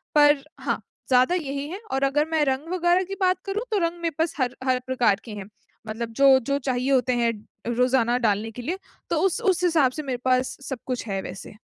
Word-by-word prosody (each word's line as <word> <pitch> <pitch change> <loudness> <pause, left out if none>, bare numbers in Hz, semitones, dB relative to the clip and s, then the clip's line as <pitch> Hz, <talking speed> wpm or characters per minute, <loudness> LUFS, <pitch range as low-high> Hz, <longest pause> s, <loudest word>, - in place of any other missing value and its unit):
पर 290 -1 +6 0.2
हाँ, - - -2 0.3
ज़्यादा 255 +6 +4
यही 280 -4 -3
हैं। 375 +4 -6
और 270 +1 0
अगर 285 +2 +2
मैं 320 -2 +2
रंग 270 +3 -1
वगैरह 355 +1 +3
की 390 +2 -6
बात 370 0 +3
करूँ, 405 +3 -2
तो 425 - +2
रंग 340 0 -1
मेरे 335 -3 -2
पास 325 0 +1
हर 250 -2 0
हर 255 -1 +2
प्रकार 240 -6 +2
के 225 - -8
हैं। 205 -2 -6 0.4
मतलब 225 +1 -4
जो-जो 275 0 +5
चाहिए 255 +2 0
होते 255 -1 +3
हैं 230 - +3 0.4
रोज़ाना 250 -1 +3
डालने 210 +2 0
के 245 - -8
लिए, 335 +10 -3 0.3
तो 335 - +1
उस-उस 385 -2 +1
हिसाब 320 -7 +4
से 305 +4 -5
मेरे 260 -3 -2
पास 255 0 +1
सब 265 -3 -4
कुछ 255 -3 -3
है 195 -2 -2
वैसे। 190 0 -8
270 Hz, 210 wpm, -24 LUFS, 245-335 Hz, 0.4 s, पर